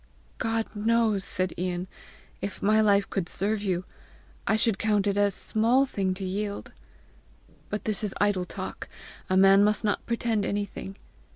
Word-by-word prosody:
"God 225 -1 0
knows," 220 -2 +2
said 185 -1 0
Ian, 180 0 -2 0.5
"if 200 - -5
my 215 +2 +4
life 200 -2 +3
could 185 -3 -3
serve 205 +2 -1
you, 185 -3 -1 0.6
I - - +3
should 220 -2 +1
count 210 -2 +2
it 200 -1 +1
a 205 0 +3
small 230 +7 +2
thing 190 -7 -1
to 190 0 -5
yield! 200 +2 -4 1.0
But 210 - -4
this 215 -1 0
is 205 - -1
idle 200 -3 +2
talk! - - -7 0.4
A 185 - +3
man 195 +1 +7
must 210 +1 +2
not 205 -2 0
pretend 230 -2 0
anything! 200 -1 -4
205 Hz, 160 wpm, -27 LUFS, 195-215 Hz, 1.0 s, man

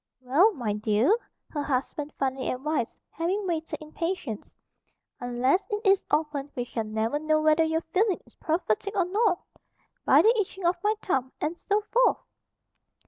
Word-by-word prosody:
"Well, 280 - +4
my 230 -7 -2
dear," 215 - +3 0.3
her 295 - -3
husband 285 +2 -2
finally 265 -1 -1
advised, 265 -1 -2
having 370 +6 -1
waited 325 -3 -2
in 310 -1 -12
patience, 330 - -4 0.6
"unless 245 +8 +1
it 420 +1 -3
is 390 0 +5
opened 295 -2 0
we 245 - -1
shall 230 -2 -4
never 220 +6 -1
know 310 0 +2
whether 310 +1 +4
your 320 0 0
feeling 400 0 +2
is - - -21
prophetic 330 - -1
or 370 - +3
not. 390 0 +1 0.6
'By - - +6
the 455 +3 +5
itching 380 -2 -6
of 345 0 +1
my 425 +1 +2
thumb,' 265 -7 -1
and 315 +3 -1
so 410 +1 +1
forth!" 485 +4 +3
310 Hz, 160 wpm, -27 LUFS, 260-375 Hz, 0.6 s, By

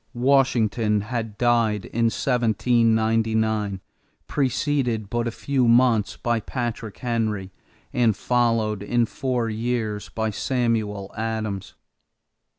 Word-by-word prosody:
Washington 120 -5 +2
had 110 -1 -4
died 115 -4 +2
in 115 0 -1
1799, 110 -3 +1 0.5
preceded 130 -5 0
but 120 0 0
a - - -1
few 130 +1 0
months 115 -4 +3
by 120 -1 0
Patrick 115 -2 -4
Henry 110 -5 -2 0.4
and 115 -5 +2
followed 115 -4 +1
in 120 +3 +1
four 125 -1 -2
years 110 -2 -2
by 110 -1 -2
Samuel 110 -4 -1
Adams. 110 -3 -3
115 Hz, 100 wpm, -24 LUFS, 110-120 Hz, 0.5 s, months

